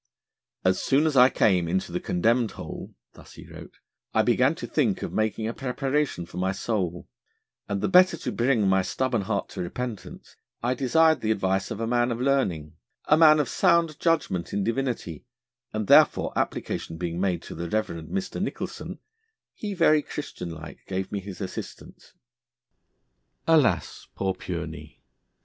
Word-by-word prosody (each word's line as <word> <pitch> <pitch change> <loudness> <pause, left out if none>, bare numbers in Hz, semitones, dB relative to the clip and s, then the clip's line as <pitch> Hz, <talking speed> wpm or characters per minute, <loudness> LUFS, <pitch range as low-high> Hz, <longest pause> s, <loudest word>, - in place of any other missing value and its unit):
'As 95 0 +2
soon 140 +4 +2
as 155 -3 +1
I 125 0 +8
came 90 -9 +2
into 90 +1 -1
the 90 - -2
condemned 115 +5 +1
Hole,' - - -8 0.2
thus - - -15
he - - -12
wrote, - - -12 0.4
'I - - +4
began - - +3
to - - -6
think - - 0
of - - -5
making 110 0 -1
a 115 - -3
preparation 135 - -1
for 85 - -11
my 95 +1 0
soul; 95 -4 -3 0.6
and 100 -1 -1
the - - +1
better 185 -2 +5
to - - -4
bring 120 -4 +2
my 95 0 +4
stubborn 120 +4 -1
heart 95 - -2
to - - -6
repentance, 115 +5 -6 0.3
I 125 +2 +2
desired 155 +3 +3
the 110 - -1
advice 95 -2 0
of - - -5
a 115 - -1
man 120 +1 +1
of 115 - -3
learning, 90 - 0 0.3
a 150 - +5
man 155 -1 +7
of 150 - +1
sound 165 -3 +2
judgment 160 - 0
in 100 0 0
divinity, 115 - -3 0.4
and 110 0 -2
therefore - - +5
application 80 - -3
being 85 0 -3
made 95 -3 0
to - - -8
the 85 0 -5
Reverend 85 -6 -2
Mr. 190 -1 -3
Nicholson, 205 - -5 0.6
he 205 -2 -5
very 155 -3 +4
Christian 145 -12 -6
like 80 -2 -9
gave 95 0 -3
me 100 - -2
his 95 -1 -9
assistance.' 95 - -8 1.3
Alas! 130 - +2
Poor 95 -1 -1
Pureney! - - -7
110 Hz, 165 wpm, -26 LUFS, 95-140 Hz, 1.3 s, I